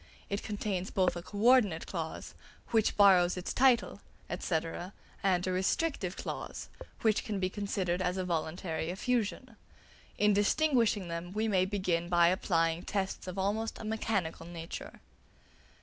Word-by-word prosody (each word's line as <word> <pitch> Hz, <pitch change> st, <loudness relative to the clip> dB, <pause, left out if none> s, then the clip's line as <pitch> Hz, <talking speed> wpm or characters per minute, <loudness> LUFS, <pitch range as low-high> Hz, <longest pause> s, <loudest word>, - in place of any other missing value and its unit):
It 200 Hz, -, -1 dB
contains 200 Hz, -3 st, -3 dB
both 185 Hz, -2 st, +1 dB
a 175 Hz, -, -4 dB
co 205 Hz, +4 st, -9 dB
ordinate 215 Hz, -7 st, +4 dB
clause, 165 Hz, -3 st, -5 dB, 0.4 s
"Which 220 Hz, -2 st, +2 dB
borrows 185 Hz, -3 st, +6 dB
its 180 Hz, -, -3 dB
title," 245 Hz, -5 st, +3 dB, 0.4 s
&c., 160 Hz, -3 st, +1 dB, 0.6 s
and 185 Hz, -3 st, +2 dB
a 185 Hz, -, 0 dB
restrictive 190 Hz, -, 0 dB
clause, -, -, -6 dB, 0.3 s
"Which 220 Hz, -2 st, +3 dB
can 210 Hz, -3 st, -3 dB
be 185 Hz, 0 st, -1 dB
considered 190 Hz, -3 st, -1 dB
as 180 Hz, 0 st, 0 dB
a 185 Hz, -, -1 dB
voluntary 165 Hz, -1 st, -2 dB
effusion." 230 Hz, +4 st, -2 dB, 0.6 s
In 210 Hz, 0 st, +4 dB
distinguishing 220 Hz, -, +2 dB
them 170 Hz, +2 st, -5 dB
we 215 Hz, +2 st, 0 dB
may 185 Hz, -3 st, +3 dB
begin 185 Hz, -4 st, -1 dB
by 170 Hz, -1 st, +5 dB
applying 165 Hz, -3 st, +1 dB
tests 190 Hz, -1 st, -3 dB
of 185 Hz, +1 st, -5 dB
almost 210 Hz, +4 st, -1 dB
a -, -, -8 dB
mechanical 215 Hz, -7 st, -2 dB
nature. 170 Hz, -1 st, -8 dB
190 Hz, 145 wpm, -31 LUFS, 175-210 Hz, 0.6 s, borrows